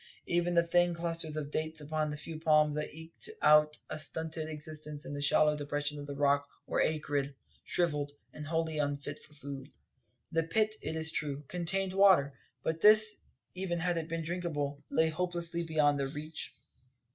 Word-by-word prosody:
Even 175 Hz, 0 st, +1 dB
the 170 Hz, 0 st, +4 dB
thin 175 Hz, 0 st, +3 dB
clusters 165 Hz, -2 st, -2 dB
of 145 Hz, -1 st, -4 dB
dates 155 Hz, +1 st, -2 dB
upon 155 Hz, +1 st, -2 dB
the 150 Hz, -, -4 dB
few 160 Hz, +1 st, -7 dB
palms 150 Hz, -2 st, +4 dB
that 150 Hz, 0 st, -3 dB
eked 160 Hz, -, -9 dB
out 150 Hz, 0 st, +6 dB
a -, -, -5 dB
stunted 160 Hz, 0 st, -2 dB
existence 150 Hz, -1 st, -5 dB
in 145 Hz, -, -5 dB
a 145 Hz, -, -4 dB
shallow 150 Hz, +1 st, +4 dB
depression 145 Hz, 0 st, -3 dB
of 145 Hz, -, -7 dB
the 140 Hz, -, -5 dB
Rock 140 Hz, 0 st, +2 dB, 0.2 s
were -, -, 0 dB
acrid, 145 Hz, -3 st, -1 dB, 0.3 s
shrivelled, 150 Hz, -5 st, +1 dB, 0.2 s
and 150 Hz, -1 st, -7 dB
wholly 160 Hz, -1 st, -1 dB
unfit 145 Hz, 0 st, -2 dB
for 150 Hz, -, -19 dB
food. 140 Hz, -1 st, -8 dB, 0.6 s
The 165 Hz, 0 st, +2 dB
pit, 215 Hz, +6 st, +1 dB
it 160 Hz, -, -3 dB
is 160 Hz, 0 st, +3 dB
true, 145 Hz, -2 st, -2 dB
contained 185 Hz, +3 st, -1 dB
water; 190 Hz, -8 st, +5 dB, 0.3 s
but 160 Hz, 0 st, -2 dB
this, 215 Hz, 0 st, +7 dB, 0.4 s
even 185 Hz, -2 st, -2 dB
had 175 Hz, +1 st, 0 dB
it 165 Hz, -1 st, -3 dB
been 165 Hz, 0 st, -2 dB
drinkable, 155 Hz, -4 st, -3 dB
lay 160 Hz, 0 st, +3 dB
hopelessly 170 Hz, 0 st, -2 dB
beyond 150 Hz, -3 st, +2 dB
their 135 Hz, -, 0 dB
reach. 150 Hz, +2 st, -3 dB
155 Hz, 175 wpm, -32 LUFS, 145-170 Hz, 0.6 s, this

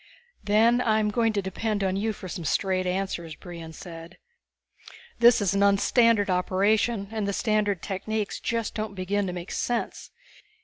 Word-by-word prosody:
"Then 225 Hz, +4 st, +4 dB
I'm 215 Hz, -2 st, +2 dB
going 225 Hz, 0 st, +2 dB
to 200 Hz, -2 st, -1 dB
depend 205 Hz, +2 st, -2 dB
on 190 Hz, -1 st, 0 dB
you 215 Hz, +3 st, 0 dB
for 195 Hz, -3 st, -8 dB
some 175 Hz, 0 st, -6 dB
straight 185 Hz, +3 st, 0 dB
answers," 180 Hz, -4 st, -3 dB
Brion 170 Hz, -2 st, -9 dB
said. 165 Hz, +1 st, -10 dB, 1.0 s
"This 235 Hz, -1 st, +6 dB
is 200 Hz, -2 st, +1 dB
an 200 Hz, -, +1 dB
un 200 Hz, 0 st, +5 dB
standard 230 Hz, -1 st, +3 dB
operation, 200 Hz, +3 st, +1 dB
and 215 Hz, -2 st, -2 dB
the 200 Hz, -, -1 dB
standard 205 Hz, -4 st, 0 dB
techniques 205 Hz, +2 st, -3 dB
just 230 Hz, -2 st, -2 dB
don't 215 Hz, -2 st, -4 dB
begin 195 Hz, +2 st, -1 dB
to 180 Hz, -, -3 dB
make 175 Hz, +1 st, -7 dB
sense. 240 Hz, -1 st, -3 dB
200 Hz, 165 wpm, -26 LUFS, 185-220 Hz, 1.0 s, This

